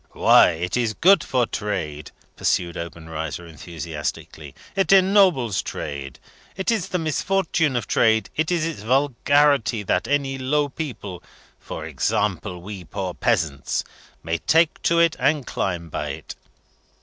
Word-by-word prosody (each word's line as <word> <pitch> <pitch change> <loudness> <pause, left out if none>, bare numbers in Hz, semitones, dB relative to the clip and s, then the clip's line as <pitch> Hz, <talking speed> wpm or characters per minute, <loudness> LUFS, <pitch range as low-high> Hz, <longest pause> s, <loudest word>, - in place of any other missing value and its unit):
"Why, 90 - +6
it 85 +2 -3
is 115 -3 0
good 195 +3 +5
for 125 -2 +1
trade!" 85 -10 -4 0.3
pursued 85 -1 0
Obenreizer, 80 -1 -6
enthusiastically. 80 -2 -6 0.2
"It 195 0 +1
ennobles 185 - +4
trade! 70 -3 -6 0.4
It 190 - 0
is 205 -5 -1
the 185 - -1
misfortune 165 -2 0
of 120 -4 -1
trade, 110 0 +2
it 160 0 0
is 170 -3 +1
its 165 -10 -4
vulgarity, 135 -1 +2
that - - 0
any 135 -2 0
low 145 +2 +1
people 125 - -6 0.4
for - - -7
example, 95 -3 -1
we 100 -1 -7
poor 95 +1 -4
peasants 70 -5 0 0.4
may 80 0 -2
take 165 0 +2
to 170 - +2
it 170 -1 +4
and 150 -4 +1
climb 85 -3 -3
by 80 - -4
it. - - -7
115 Hz, 135 wpm, -23 LUFS, -, 0.4 s, Why